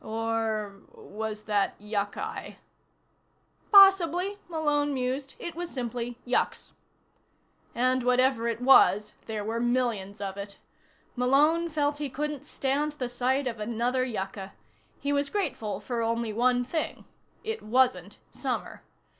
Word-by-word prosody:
Or 220 -2 -2 0.2
was 215 0 -6
that 205 -2 0
yucci? 210 - -4 1.2
Possibly, 390 -1 +6
Malone 295 -3 0
mused, 260 +2 -3
it 345 - -6
was 345 +1 -5
simply 240 -1 -4
yucks. 250 - 0 1.0
And 255 +1 +2
whatever 250 -1 +2
it 230 +1 -2
was, 210 -5 +5
there 215 -2 -3
were 225 +2 -2
millions 235 -5 0
of 195 -1 -4
it. 200 0 -7 0.6
Malone 295 +7 +3
felt 290 -2 0
he 290 -2 -2
couldn't 295 +1 -4
stand 290 +1 -1
the 255 -5 -4
sight 260 +3 0
of 230 -3 -3
another 235 +4 0
yucca. 195 -5 -5 0.5
He 285 +1 -1
was 280 0 +1
grateful 225 - -2
for 235 +2 -3
only 230 -1 -1
one 245 +2 +2
thing. 315 +5 -3 0.4
It 445 0 -3
wasn't 215 -5 +1
summer. - - -4
250 Hz, 125 wpm, -28 LUFS, 220-290 Hz, 1.2 s, Possibly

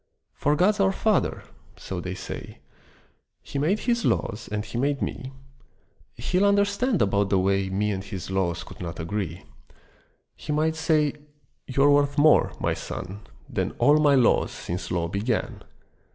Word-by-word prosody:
For 145 +1 +1
God's 205 +6 +3
our 195 -1 +4
Father, 210 0 0 0.3
so 90 -2 -5
they 90 +1 -5
say, - - -8 0.9
He 140 - -4
made 180 +9 +1
His 235 -2 0
laws 110 0 -1
and 105 0 -2
He 105 - -10
made 140 +1 +1
me; 130 -1 -4 0.8
He'll 185 +2 +1
understand 200 +2 +2
about 100 0 +1
the 95 - +3
way 95 +1 +1
Me 105 +2 0
and 95 -1 -3
His 95 -1 -7
laws 90 -3 -1
could - - -13
not 85 -1 -6
agree. 90 0 -4 0.9
He - - -6
might 155 +2 +1
say, 155 -2 +2 0.5
"You're 140 +2 +4
worth 145 0 +3
more, 150 +1 +5
My - - 0
son, 95 +3 -6 0.3
Than - - -2
all 150 +1 +5
My 145 -2 +5
laws 125 -3 +3
since 90 +2 -5
law 85 -2 -1
began. 105 +6 -2
130 Hz, 155 wpm, -25 LUFS, 95-155 Hz, 0.9 s, more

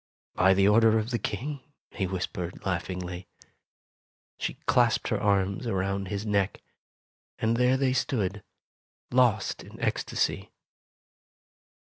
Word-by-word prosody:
"By 95 +1 +4
the 100 +1 +4
order 110 +1 +5
of 110 +2 -2
the 120 - 0
King," 135 +9 -3 0.3
he 95 -4 -2
whispered, 90 -1 -4
laugh 90 -3 -1
ingly. 90 -1 -5 1.1
She - - -2
clasped - - +3
her - - 0
arms 100 +2 +1
around 95 -1 -1
his 100 +2 -3
neck, 100 -2 0 0.7
and 115 +1 +1
there 125 +2 +3
they 130 -1 +2
stood, 105 -7 -1 0.7
lost 120 -5 +2
in - - -13
ecstasy. - - -1
100 Hz, 120 wpm, -28 LUFS, 95-115 Hz, 1.1 s, order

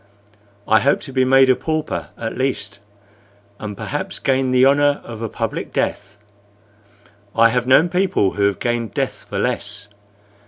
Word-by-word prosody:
"I 110 - +5
hope 140 +5 +2
to 135 - -10
be 130 -1 +2
made 135 +1 +5
a 130 - +5
pauper 155 +1 -3
at 115 -1 -4
least, 110 -7 -3 0.8
and 105 -2 -6
perhaps 190 - -4
gain 130 -1 +1
the 130 0 +4
honor 145 +1 +3
of 115 -2 -9
a 115 - -3
public - - -4
death. 105 0 -3 1.2
I 115 0 +6
have 125 +1 -1
known 140 +6 +5
people 180 - +1
who 100 -1 +1
have 100 - -1
gained 120 -2 -2
death - - -3
for - - -4
less. 100 0 -2
130 Hz, 160 wpm, -20 LUFS, 110-135 Hz, 1.2 s, I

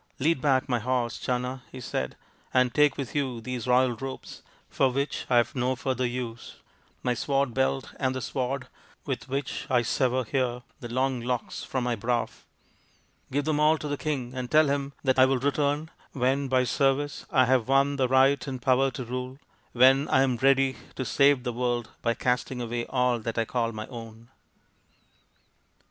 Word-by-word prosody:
" - - -41
Lead 145 0 +2
back 135 -2 +2
my 125 -3 +1
horse, 120 0 -1
Channa," 125 +1 -2
he 130 - -8
said, 65 - -3 0.2
" - - -33
and 125 -1 +3
take 150 -2 +4
with 140 -3 -5
you 130 -5 -1
these 125 +1 -5
royal 125 0 +3
robes, 135 +3 -7 0.3
for 135 - +2
which 140 +3 -2
I 125 - +4
have 120 - +2
no 130 -1 0
further 130 -1 -1
use, 120 -2 -6 0.5
my 125 - +1
sword 135 +1 0
belt 135 +1 0
and 130 -1 0
the 130 - -3
sword 130 +1 -3 0.4
with 135 -1 -4
which 135 0 -3
I 125 -2 +3
sever 130 +2 +1
here 125 0 -1 0.2
the 120 - -7
long 130 +1 0
locks 125 0 -3
from 130 -2 -2
my 120 -1 0
brow. 115 +2 -1 1.0
Give 140 +1 0
them 155 -1 +1
all 155 +1 +4
to 150 - -5
the 145 - -1
king, 135 -5 -3
and 125 -1 -4
tell 155 0 +5
him 140 0 -2
that 130 -1 +2
I 130 - +8
will 135 0 +2
return 145 +3 0 0.2
when 135 +2 +1
by 130 -1 +3
service 135 +3 0
I 130 -2 +4
have 125 -2 +2
won 140 +1 +3
the 130 -2 +2
right 135 +3 +3
and 130 -2 -4
power 130 +2 +3
to 130 -1 -6
rule, 125 +2 -5 0.3
when 135 +3 +5
I 135 - +4
am 130 -3 +1
ready 135 0 +3 0.2
to 130 - -3
save 140 -1 +3
the 120 -2 -2
world 120 -1 -1
by 115 -1 +1
casting 125 0 -1
away 120 0 -3
all 125 -2 +1
that 115 +1 -4
I 115 - +2
call 115 0 -1
my 110 -1 -6
own." 115 -1 -10
130 Hz, 190 wpm, -27 LUFS, 125-135 Hz, 1.0 s, I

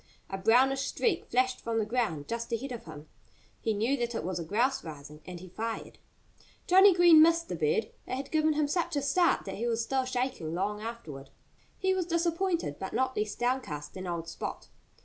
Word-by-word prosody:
A 195 - -2
brownish 260 +6 +3
streak 415 -8 0
flashed 255 +1 +1
from 230 -1 -2
the 220 - +1
ground 215 -11 -1
just 235 0 -4
ahead 255 +4 -3
of 240 - -7
him. 150 +1 -10 0.5
He 225 - -1
knew 230 +7 +1
that 240 -1 -2
it - - -2
was 180 +1 -3
a - - -3
grouse 235 +10 0
rising. 150 -1 -10
And 180 -1 -7
he 185 - -10
fired. 225 +5 -5 0.7
Johnnie 380 +1 +7
Green 345 -3 +8
missed 335 +1 +4
the - - -2
bird. 450 0 0 0.2
It - - -2
had 270 +1 -6
given 315 0 +3
him 300 -1 +1
such 340 +2 -1
a 285 - 0
start 345 +5 +2
that 195 - -5
he 235 +3 -2
was 230 -1 0
still 265 +2 0
shaking 250 -11 -2
long 205 +3 -2
afterward. 160 -13 -7 0.5
He 380 0 +1
was 365 -2 -1
disappointed, 335 - 0
but 190 - -5
not 260 0 0
less 210 0 -2
downcast 240 - -2
than 185 0 -6
old 170 -1 -3
Spot. 165 - -6
240 Hz, 205 wpm, -30 LUFS, 190-310 Hz, 0.7 s, Green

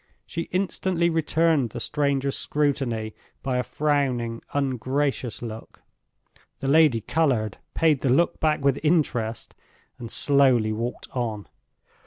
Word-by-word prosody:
She 165 -2 -5
instantly 180 -2 0
returned 160 -4 +2
the 120 - -6
stranger's 140 0 0
scrutiny 130 -7 -1 0.3
by 130 -2 0
a - - 0
frowning, 130 -6 -1
ungracious 135 -2 -1
look. 110 -1 -9 0.8
The 135 - -3
lady 145 -5 +4
colored, 120 -7 0 0.2
paid 155 -4 +3
the 135 - +1
look 170 +7 +2
back 150 -3 +1
with 140 0 +3
interest, 130 -9 0 0.5
and 115 -2 -7
slowly 130 -5 +3
walked 115 +3 -4
on. 110 -5 -3
135 Hz, 120 wpm, -25 LUFS, 120-150 Hz, 0.8 s, lady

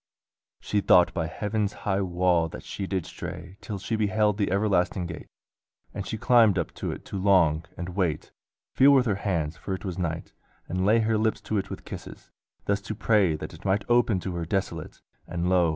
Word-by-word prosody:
She 105 - 0
thought 90 -2 +5
by 80 -3 -1
heaven's 105 +3 -2
high 100 -1 +1
wall 90 -2 +2
that - - -9
she 95 - -5
did 95 -4 -2
stray 90 +3 -8
Till 105 - -5
she 110 +4 -3
beheld 105 -1 +1
the 100 - +1
everlasting 95 -2 +1
gate: 85 -2 -7 0.7
And - - -5
she 110 - -3
climbed 110 -4 +5
up 90 - -2
to - - -1
it - - -8
to 100 - -5
long, 85 -5 +4
and 90 0 -5
wait, 90 -5 -1 0.4
Feel 140 +2 +6
with 130 -2 +5
her 110 - +2
hands 80 -6 -1
(for 95 +4 -4
it 95 - -9
was 95 -1 -4
night), 85 -2 -3 0.3
and 95 +2 -1
lay 115 +2 +5
Her 110 0 +1
lips 110 0 +1
to 110 - -1
it 100 - -5
with - - -8
kisses; - - -9 0.3
thus 100 0 0
to 105 +2 -5
pray 105 -6 +3
That - - -7
it - - -13
might 100 +1 0
open 120 -5 +3
to 95 - -4
her 85 - -2
desolate. 95 +1 -3 0.2
And 85 0 -2
lo! 90 -2 +4
95 Hz, 205 wpm, -26 LUFS, 90-105 Hz, 0.7 s, Feel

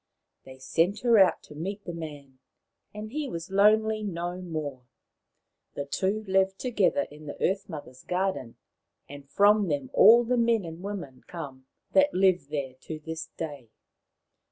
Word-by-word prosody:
They 130 0 -12
sent 165 +10 0
her 235 -3 +5
out 190 - +4
to - - -13
meet 195 +7 -5
the 175 - -5
man, 145 -5 -9 0.5
and 210 +1 -7
he 300 +1 -3
was 170 -1 -6
lonely 215 +2 +4
no 175 -2 -4
more. 155 -7 -5 0.9
The 140 - -3
two 195 +9 -1
lived 190 -1 +1
together 210 - +1
in 150 +1 -12
the 145 - -7
Earth 195 +1 0
mother's 145 -6 -9
garden, 180 -10 -2 0.5
and 140 -1 -11
from 205 +4 +4
them 140 -5 -2
have - - -33
all 230 +4 +8
the 245 +1 0
men 230 -4 +2
and 165 +1 -8
women 185 -10 -6
come 135 -6 -8 0.2
that 285 0 +4
live 185 -6 +3
there 140 -4 -3
to 160 - -6
this 160 +1 -6
day. 145 -7 -6
175 Hz, 160 wpm, -27 LUFS, 145-205 Hz, 0.9 s, all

